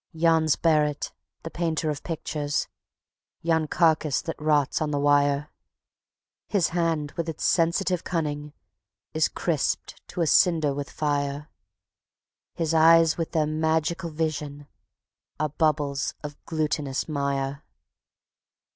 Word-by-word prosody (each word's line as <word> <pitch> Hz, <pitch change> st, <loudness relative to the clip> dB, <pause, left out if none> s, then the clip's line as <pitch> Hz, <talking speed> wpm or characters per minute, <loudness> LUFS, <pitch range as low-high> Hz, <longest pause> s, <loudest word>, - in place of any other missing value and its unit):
Yon's 160 Hz, -2 st, +3 dB
Barret, 150 Hz, -3 st, +1 dB, 0.3 s
the 165 Hz, -, -6 dB
painter 160 Hz, -2 st, -1 dB
of 145 Hz, -, -5 dB
pictures, 150 Hz, -3 st, -2 dB, 0.8 s
yon 160 Hz, -1 st, +1 dB
carcass 155 Hz, -4 st, +2 dB
that 165 Hz, -4 st, -6 dB
rots 150 Hz, -2 st, +2 dB
on 155 Hz, -, 0 dB
the 145 Hz, -, -1 dB
wire; 145 Hz, 0 st, +2 dB, 1.0 s
His 195 Hz, -5 st, +1 dB
hand 165 Hz, -4 st, -1 dB
with 170 Hz, -1 st, -4 dB
its 160 Hz, -, -5 dB
sensitive 175 Hz, +1 st, +2 dB
cunning 150 Hz, -3 st, -3 dB, 0.6 s
is 155 Hz, 0 st, +3 dB
crisped 160 Hz, -6 st, -2 dB
to 180 Hz, -, -4 dB
a -, -, +3 dB
cinder 160 Hz, -2 st, +3 dB
with 140 Hz, 0 st, -5 dB
fire; 145 Hz, 0 st, -2 dB, 1.1 s
His 165 Hz, -1 st, -1 dB
eyes 165 Hz, 0 st, +6 dB
with 165 Hz, -, -3 dB
their 155 Hz, -2 st, +2 dB
magical 160 Hz, +3 st, 0 dB
vision 150 Hz, -2 st, -3 dB, 0.7 s
are 155 Hz, -, 0 dB
bubbles 150 Hz, -2 st, 0 dB
of 145 Hz, -1 st, -6 dB
glutinous 150 Hz, -4 st, -2 dB
mire. 140 Hz, -1 st, -2 dB
155 Hz, 120 wpm, -25 LUFS, 145-165 Hz, 1.1 s, eyes